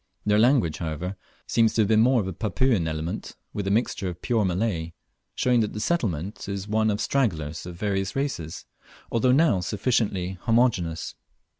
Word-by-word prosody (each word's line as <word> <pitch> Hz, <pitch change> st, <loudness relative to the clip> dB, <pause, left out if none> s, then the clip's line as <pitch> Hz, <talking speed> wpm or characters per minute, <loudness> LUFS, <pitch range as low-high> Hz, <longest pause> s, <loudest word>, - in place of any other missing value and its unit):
Their 105 Hz, 0 st, +3 dB
language, 115 Hz, -, +3 dB
however, 85 Hz, +3 st, -4 dB, 0.3 s
seems 115 Hz, -1 st, +2 dB
to 110 Hz, -, +4 dB
have 110 Hz, +1 st, +3 dB
more 120 Hz, +1 st, +4 dB
of -, -, -4 dB
the 95 Hz, -, -4 dB
Papuan 110 Hz, -1 st, +1 dB
element, 80 Hz, +2 st, -4 dB, 0.2 s
with 100 Hz, -2 st, -3 dB
a -, -, +1 dB
mixture 100 Hz, -2 st, 0 dB
of 85 Hz, -1 st, -8 dB
pure 115 Hz, -4 st, +2 dB
Malay, 90 Hz, -3 st, -1 dB, 0.4 s
showing 125 Hz, -1 st, +3 dB
that 110 Hz, -2 st, 0 dB
the 105 Hz, -, -4 dB
settlement 105 Hz, -, -2 dB
is 100 Hz, 0 st, -4 dB
one 110 Hz, +1 st, +2 dB
of 105 Hz, 0 st, 0 dB
stragglers 85 Hz, -, -1 dB
of 90 Hz, -, -7 dB
various 95 Hz, 0 st, -2 dB
races, 135 Hz, -, -3 dB, 0.5 s
although 120 Hz, +2 st, +3 dB
now 140 Hz, -, +4 dB
sufficiently 95 Hz, -3 st, -1 dB
homogeneous. 115 Hz, -9 st, +1 dB
105 Hz, 165 wpm, -25 LUFS, 90-115 Hz, 0.5 s, to